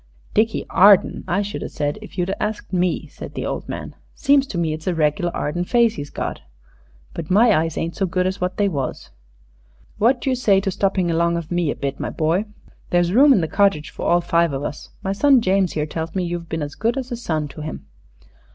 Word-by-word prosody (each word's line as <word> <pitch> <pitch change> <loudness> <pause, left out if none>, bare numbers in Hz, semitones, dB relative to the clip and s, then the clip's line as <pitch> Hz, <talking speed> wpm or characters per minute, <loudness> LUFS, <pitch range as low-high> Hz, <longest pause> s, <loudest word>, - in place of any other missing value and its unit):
"Dickie 220 +1 +1
Arden, 200 0 +5
I 190 +3 +1
should 205 +1 -5
a - - -4
said 145 +5 -3
if 215 - -12
you'd 180 +2 0
asked 210 -2 -4
me," 180 -1 0
said - - -10
the - - -3
old - - -4
man. - - -6 0.2
"Seems 280 -1 +3
to 185 - -5
me 165 -2 0
it's 155 +2 -7
a 180 - +1
reg'lar 155 +2 +1
Arden 175 +4 -2
face 235 +3 +3
he's 145 -8 -6
got. - - -4 0.7
But 165 -2 -6
my 215 +4 +5
eyes 160 0 0
ain't 165 +1 -2
so 195 - 0
good 185 +1 0
as 190 +1 -2
wot 180 0 -2
they 205 - +2
was. 140 -8 -4 0.9
What 245 +4 +3
d'you 265 - 0
say 215 -6 +3
to 195 -1 -1
stopping 190 -2 0
along 170 +1 +1
of 170 -1 -6
me 175 -3 +1
a - - -1
bit, 140 -1 -4
my - - -2
boy? 165 +6 0 0.4
There's 175 0 +2
room 280 +5 +7
in 230 - +5
the 160 - -1
cottage 195 -3 +1
for - - -4
all 175 0 +4
five 170 -2 +1
of 135 +1 -3
us. 145 - -6
My 195 - -1
son 275 +5 +5
James 190 -3 +1
here 150 -1 -1
tells 160 +2 -5
me 185 - 0
you've 170 -1 -4
been's 150 -3 -3
good 230 +4 -1
as 260 -1 -4
a - - -1
son 160 -10 -2
to 155 - -9
him." 155 +1 -6
180 Hz, 225 wpm, -21 LUFS, 160-205 Hz, 0.9 s, room